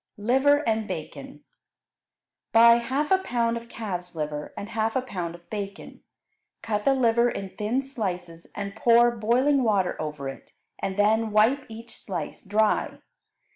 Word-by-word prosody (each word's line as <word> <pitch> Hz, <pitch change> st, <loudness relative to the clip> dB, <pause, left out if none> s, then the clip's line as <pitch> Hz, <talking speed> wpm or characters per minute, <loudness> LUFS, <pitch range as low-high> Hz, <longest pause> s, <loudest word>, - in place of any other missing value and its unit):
Liver 265 Hz, +7 st, +3 dB
and 220 Hz, -1 st, 0 dB
Bacon -, -, -7 dB, 1.1 s
Buy 235 Hz, +1 st, +7 dB
half 270 Hz, +6 st, -2 dB
a 380 Hz, -, +5 dB
pound 235 Hz, -9 st, 0 dB
of 235 Hz, 0 st, -7 dB
calf's 180 Hz, -7 st, -5 dB
liver 150 Hz, -1 st, -4 dB
and 200 Hz, -, -6 dB
half 225 Hz, -1 st, -1 dB
a 260 Hz, -, +1 dB
pound 175 Hz, -8 st, -5 dB
of 175 Hz, 0 st, -17 dB
bacon. 200 Hz, -2 st, -6 dB, 0.6 s
Cut 210 Hz, -2 st, -2 dB
the 275 Hz, -, +4 dB
liver 235 Hz, -1 st, +3 dB
in 195 Hz, -4 st, -5 dB
thin 225 Hz, +6 st, -1 dB
slices 180 Hz, -10 st, -5 dB
and 200 Hz, 0 st, -5 dB
pour 235 Hz, +1 st, +5 dB
boiling 255 Hz, +6 st, +2 dB
water 200 Hz, -6 st, +1 dB
over 150 Hz, -3 st, -5 dB
it, 135 Hz, -, -9 dB, 0.3 s
and 190 Hz, 0 st, -3 dB
then 220 Hz, +2 st, +3 dB
wipe 225 Hz, +6 st, +3 dB
each 225 Hz, +1 st, -10 dB
slice 175 Hz, -7 st, -6 dB
dry. 210 Hz, +2 st, +1 dB
220 Hz, 150 wpm, -25 LUFS, 195-240 Hz, 1.1 s, Buy